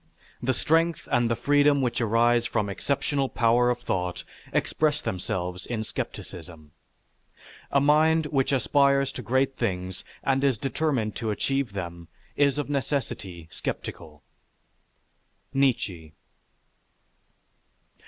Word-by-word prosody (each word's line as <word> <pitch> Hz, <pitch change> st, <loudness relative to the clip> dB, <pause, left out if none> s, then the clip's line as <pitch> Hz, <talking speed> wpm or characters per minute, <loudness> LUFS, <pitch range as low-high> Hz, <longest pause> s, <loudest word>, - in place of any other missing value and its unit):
The 130 Hz, +1 st, +1 dB
strength 165 Hz, +3 st, +1 dB
and 120 Hz, -1 st, +3 dB
the 115 Hz, -, +2 dB
freedom 145 Hz, +4 st, +3 dB
which 125 Hz, -1 st, 0 dB
arise 120 Hz, +1 st, +3 dB
from 105 Hz, -4 st, -1 dB
exceptional 140 Hz, +5 st, -1 dB
power 120 Hz, +1 st, +3 dB
of 120 Hz, 0 st, -1 dB
thought 90 Hz, -5 st, -2 dB, 0.3 s
express 150 Hz, -1 st, +1 dB
themselves 90 Hz, 0 st, -3 dB
in 115 Hz, -3 st, -2 dB
skepticism.... 80 Hz, -7 st, -7 dB, 1.0 s
A 140 Hz, -, +3 dB
mind 155 Hz, +3 st, +4 dB
which 135 Hz, -3 st, +1 dB
aspires 140 Hz, +1 st, +3 dB
to -, -, -7 dB
great 130 Hz, +4 st, +1 dB
things 95 Hz, -4 st, -2 dB, 0.2 s
and 135 Hz, 0 st, +1 dB
is 135 Hz, -4 st, +3 dB
determined 135 Hz, -3 st, -1 dB
to 115 Hz, -1 st, -2 dB
achieve 135 Hz, +2 st, -1 dB
them 85 Hz, -3 st, -6 dB, 0.3 s
is 140 Hz, -1 st, +3 dB
of 145 Hz, -, -1 dB
necessity 125 Hz, -, -3 dB
skeptical_. 75 Hz, -2 st, -6 dB, 1.3 s
NIETZSCHE. 100 Hz, -, 0 dB
120 Hz, 115 wpm, -26 LUFS, 100-140 Hz, 1.3 s, mind